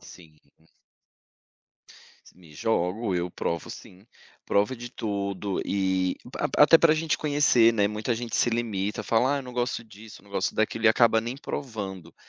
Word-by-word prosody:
Sim, 80 -3 -15 0.2
uhum. 80 - -29 1.7
Me 85 -4 -18
jogo, 100 +2 -1
eu 90 0 -2
provo 85 -1 -4
sim, 95 +4 -12 0.4
provo 105 +6 +1
de 120 0 -8
tudo 100 -2 -3
e 95 -2 0 0.2
até - - +2
até 165 - +8
para 160 -2 +5
gente 160 0 0
conhecer, 145 -6 +4
né, 105 -2 +2
muita 105 +3 -2
gente 115 -1 -4
se 120 - +2
limita, 105 -4 -2
fala: 130 +5 +2
"ah, - - -1
eu 140 - -5
não 125 -1 -10
gosto 120 -1 -2
disso, 110 -1 -14
não 100 - -20
gosto 95 -1 -1
daquilo" 110 +1 -1
e - - +8
acaba 110 0 +4
nem 120 +4 -5
provando. 100 - -6
110 Hz, 165 wpm, -26 LUFS, 95-120 Hz, 1.7 s, até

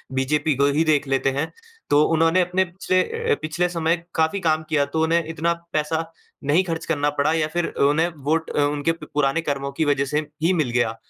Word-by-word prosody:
BJP 150 +3 +1
को 140 +2 +2
ही 150 +3 +2
देख 150 -3 +2
लेते 135 0 +1
हैं, 140 +4 -2 0.4
तो 145 +1 +5
उन्होंने 165 +3 +3
अपने 180 +1 +1
पिछले 185 +1 0 0.3
अ, - - +5
पिछले 170 +3 -1
समय 170 0 0
काफ़ी 160 +4 +1
काम 160 -3 +1
किया, 145 -2 +2
तो 160 +3 -1
उन्हें 165 +1 +2
इतना 165 +1 0 0.2
पैसा 160 +2 -1 0.4
नहीं 165 +6 +4
खर्च 165 -2 -4
करना 145 -2 0
पड़ा 145 +2 +3
या 160 -1 +1
फिर 175 0 0
अ, - - -1
उन्हें 150 +4 +3 0.2
वोट 160 +1 +1
अ, - - 0
उनके 145 +2 0
प 165 - -8
पुराने 150 +2 +1
कर्मों 140 -3 -3
की 160 - +3
वजह 140 -1 +1
से - - +4 0.2
ही 175 +3 +3
मिल 155 -8 0
गया, 115 -2 0
160 Hz, 215 wpm, -22 LUFS, 145-165 Hz, 0.4 s, तो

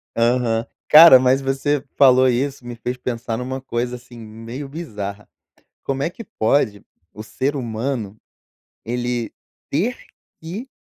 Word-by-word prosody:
Aham. 115 -1 +1 0.2
Cara, 155 -3 +10
mas 130 +1 +3
você 135 +1 -1
falou 130 -1 +6
isso, 130 +1 -1
me 120 - -6
fez 125 +2 -4
pensar 120 -2 -4
numa 130 +1 -4
coisa, 125 -1 -3
assim, 125 0 -13
meio 115 +5 -8
bizarra. 105 -10 -7 0.6
Como 135 0 -2
é 160 - 0
que 230 - -10
pode 110 - 0 0.3
o 105 - -9
ser 135 +6 -2
humano, 115 -3 -3 0.7
ele 120 0 -3 0.4
ter 205 - -1 0.4
que 195 +11 -7
125 Hz, 135 wpm, -21 LUFS, 115-140 Hz, 0.7 s, Cara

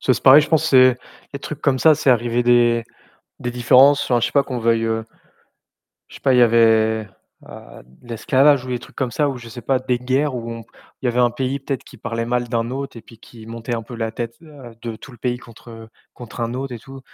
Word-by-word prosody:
C'est 130 - +1
pareil 135 +3 +8
je - - -5
pense 160 -1 +2
c'est 130 -4 +5 0.4
les 140 - -5
trucs 150 +1 -8
comme 135 -2 +1
ça, 160 +2 +5
c'est 145 -3 +1
arrivé 120 0 +1
des 120 -1 +3 0.6
des 120 - -4
différences, 130 +4 +4
enfin 120 -2 +1
je 120 - +1
sais 125 - -6
pas 140 - +4
qu'on 130 -2 -5
veuille, 115 0 +1
heu 110 0 -2 1.1
Je - - -15
sais - - -14
pas, 135 -2 +2
il - - +4
y 125 - +6
avait, 110 -2 +3 0.4
heu, - - -13 0.2
l'esclavage 130 +3 +2
ou 130 - -9
des 125 -1 -2
trucs - - -16
comme 130 -2 -2
ça 145 +2 0
ou 135 - -4
je 120 -1 -11
sais 120 0 -10
pas 130 +2 +1
des 125 -1 -2
guerres 130 +3 -1
où 115 -1 -5
on 115 0 -7 0.4
il 130 - -1
y - - +2
avait 120 +1 -1
un 120 - +3
pays 130 +3 -3
peut-être 135 -1 -5
qui - - -15
parlait 115 0 -4
mal 120 0 -1
d'un 115 0 -2
autre 135 -1 -6
et - - -8
puis 115 - -17
qui 115 -1 -15
montait 115 +1 -5
un 115 - -4
peu 120 - -11
la 110 -1 -3
tête 115 0 -6
à 140 -7 -13
de 115 -2 -5
tout 135 - -13
le 120 - -15
pays 125 0 -2
contre, 120 0 -15
heu, 115 0 -11 0.3
contre 120 0 -10
un 115 +1 -2
autre 135 0 -5
et - - -7
tout 135 +4 -12
120 Hz, 255 wpm, -20 LUFS, 115-130 Hz, 1.1 s, pareil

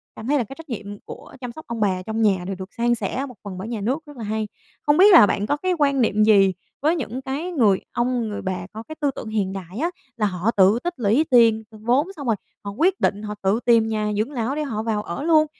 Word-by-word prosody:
cảm 220 - -8
thấy 290 +2 +3
là 245 - +1
cái 270 +6 -10
trách 325 -3 -12
nhiệm 205 -3 -6
của - - -11
chăm 250 -2 -5
sóc 315 +6 -11
ông 235 -1 -4
bà 190 -3 +1
trong 220 +3 -3
nhà 195 -4 +2
đều 195 - -3
được 190 +1 -9
san 240 +1 +1
sẻ 235 +6 -3
một 250 - -11
phần 190 -3 -7
bởi 195 +4 -6
nhà 230 -3 -4
nước, 260 +9 0
rất 290 -3 -13
là 225 - -6
hay. 215 0 -2 0.4
Không 295 +2 +4
biết 400 +2 +8
là 330 - +10
bạn 200 +2 -1
có 290 - 0 0.2
quan 280 -2 +3
niệm 215 -2 +3
gì 195 -3 +5 0.3
với 315 +4 +3
những 255 -3 -4
cái 285 +7 -4
người 220 - +3
ông, 240 -2 -1
người 205 - -5
bà 185 -1 -4
có 220 +1 -7
cái 315 - -9
tư 285 -2 +2
tưởng 220 - -6
hiện 200 -3 -1
đại 190 0 -8
á, 335 +4 +1 0.3
là 215 - +1
họ 190 +2 0
tự 200 +2 +4
tích 350 0 -2
lũy 235 +7 +2
tiền, 230 -2 +5
vốn, 240 - +1
xong 285 -5 -7
rồi 225 - +3 0.3
họ 200 - -5
quyết 355 - +1
định 205 +1 +1
họ 210 0 -5
tự 195 +4 +2
tìm 230 -2 +5
nhà 215 -1 -1
dưỡng 225 +7 -1
lão 250 +1 -2
để 305 - -1
họ 220 -7 -3
vào 215 -2 -1
ở 190 +11 -5
luôn. 315 -2 +5
225 Hz, 270 wpm, -22 LUFS, 205-275 Hz, 0.4 s, là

